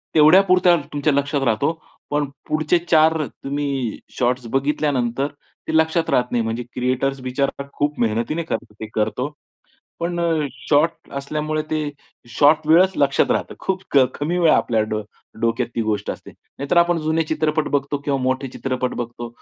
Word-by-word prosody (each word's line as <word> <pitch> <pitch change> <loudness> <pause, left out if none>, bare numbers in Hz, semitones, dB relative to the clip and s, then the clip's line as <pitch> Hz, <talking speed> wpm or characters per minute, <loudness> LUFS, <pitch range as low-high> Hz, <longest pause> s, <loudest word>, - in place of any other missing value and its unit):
तेवढ्यापुरता 180 +3 +6 0.2
तुमच्या 145 +1 +1
लक्षात 140 0 0
राहतो. 115 +7 +1 0.4
पण 145 0 +1 0.2
पुढचे 155 +3 +2
४ 160 -2 +3
तुम्ही 140 -4 -3 0.2
शॉट्स 125 0 0
बघितल्यानंतर 135 -2 0 0.4
ते 160 - -1
लक्षात 160 +1 +2
राहत 125 0 +1
नाही. 120 -2 +1
म्हणजे 115 +2 -3
क्रिएटर्स 130 +2 -1
बिचारा 135 +2 -2
खूप 145 +1 -1
मेहनतीने 120 +8 0
कर 160 - -1
ते 110 +1 -8
करतो 110 +5 -1 0.7
पण 175 +1 -2 0.5
शॉर्ट 155 +3 +2
असल्यामुळे 155 +2 -2
ते 155 - 0 0.5
शॉर्ट 150 +5 +3
वेळच 180 +4 +6
लक्षात 140 -2 +3
राहतं. - - -1
खूप 190 -1 -2 0.3
कमी 165 +5 -2
वेळा 165 -3 +5
आपल्या 110 -2 +1
डो 110 0 -2 0.4
डोक्यात 115 +1 +1
ती 115 - +1
गोष्ट 105 -2 -2
असते. - - -10
नाहीतर 140 +5 -4
आपण 170 0 +4
जुने 160 +1 +2
चित्रपट 155 0 0
बघतो 140 +1 -1
किंवा 140 -2 0
मोठे 130 +1 0
चित्रपट 130 0 -3
बघतो. 120 0 -5
145 Hz, 150 wpm, -21 LUFS, 125-155 Hz, 0.7 s, तेवढ्यापुरता